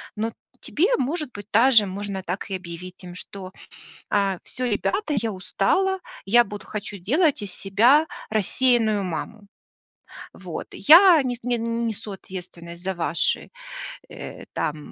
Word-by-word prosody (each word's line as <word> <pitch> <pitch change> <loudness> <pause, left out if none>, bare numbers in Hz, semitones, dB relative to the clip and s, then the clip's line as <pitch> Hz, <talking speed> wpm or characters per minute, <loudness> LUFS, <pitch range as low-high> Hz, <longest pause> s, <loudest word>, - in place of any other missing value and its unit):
Но 220 +1 -1
т - - -29 0.3
тебе 345 +7 +1
может 300 +1 -2
быть 205 -1 -9
даже 230 -1 +6
можно 195 0 -5
так 185 +3 -4
и 195 - -2
объявить 180 0 -8
им, 175 -1 -9
что, 185 0 -8 0.6
э, 195 -2 +2
всё, 255 - -4
ребята, 305 - 0
я 225 - -1
устала, 380 - +1 0.3
я 240 +5 +6
буду 205 +1 -8
хочу 205 -1 -6
делать 285 - +2
из 200 -2 -5
себя 235 - +4 0.2
рассеянную 220 0 +2
маму. 195 +5 -5 0.9
Вот, - - -7
я 335 +1 +8
нес 245 -1 -2
не 245 0 0
н 230 0 -1
несу 220 -2 -4
ответственность 175 -2 -9
за 190 +1 -1
ваши, 170 -2 0 0.6
э, - - -9
там, 150 - -1
210 Hz, 145 wpm, -24 LUFS, 190-245 Hz, 0.9 s, я